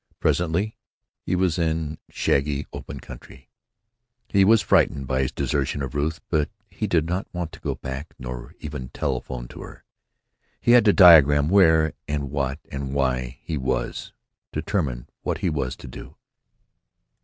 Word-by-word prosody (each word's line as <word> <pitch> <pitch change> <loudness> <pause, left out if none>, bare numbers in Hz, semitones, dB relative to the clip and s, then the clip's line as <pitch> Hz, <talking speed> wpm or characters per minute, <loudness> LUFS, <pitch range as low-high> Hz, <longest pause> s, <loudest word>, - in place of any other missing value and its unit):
Presently 90 +5 0 0.5
he - - -1
was 90 -1 +1
in 80 -2 -1
shaggy, 70 +1 0
open - - -7
country. 65 -1 -13 0.8
He 100 -1 +4
was 110 +2 +5
frightened 70 - +2
by 65 0 0
his 65 - -1
desertion 70 0 -1
of 65 - -5
Ruth, 75 +3 -1
but 75 -3 +1 0.2
he 105 +3 -3
did 85 -5 +2
not 90 +3 -2
want 90 -2 -4
to - - -12
go - - -3
back, 70 +4 -7
nor 60 -1 -7
even 70 -4 -6
telephone - - -3
to - - -10
her. - - -11 0.8
He - - +2
had 120 -1 +7
to 105 - +7
diagram 75 -5 +7
where 80 -5 +5
and 70 -2 -2
what 70 -1 -1
and 70 -1 -4
why 65 -2 0
he 80 -3 -3
was; 65 - -2 0.4
determine 65 -11 -2
what - - -2
he 90 - -1
was 70 -3 -2
to - - -11
do. 60 - -10
75 Hz, 155 wpm, -24 LUFS, 65-85 Hz, 0.8 s, had